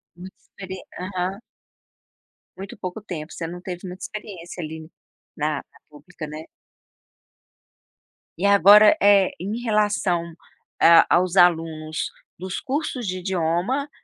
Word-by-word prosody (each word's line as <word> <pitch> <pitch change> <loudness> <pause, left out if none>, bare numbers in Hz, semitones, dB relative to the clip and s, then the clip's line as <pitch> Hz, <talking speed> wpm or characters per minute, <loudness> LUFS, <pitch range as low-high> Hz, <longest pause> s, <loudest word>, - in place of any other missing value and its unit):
Muito, 185 +2 -11
experi 190 -1 -10 0.2
aham. 185 +1 -3 1.2
Muito 195 +5 -9
pouco 185 +2 -6
tempo, 165 -6 -7
você 165 - -5
não 175 +2 -8
teve 180 0 -7
muita 180 +1 -9
experiência 185 -5 -8
ali 160 0 -8 0.5
na, 150 0 -1
na - - -12
pública, 150 +1 -10
né? 155 +1 -8 1.9
E 180 - -2
agora, 200 - +7
eh, 200 -2 +5
em 205 +7 -4
relação 205 -6 0 0.5
a 165 0 +8
aos 180 +1 +2
alunos 160 -3 +2 0.3
dos 185 +1 -5
cursos 270 -3 -3
de 185 -1 -3
idioma 185 - -1
180 Hz, 120 wpm, -23 LUFS, 165-200 Hz, 1.9 s, a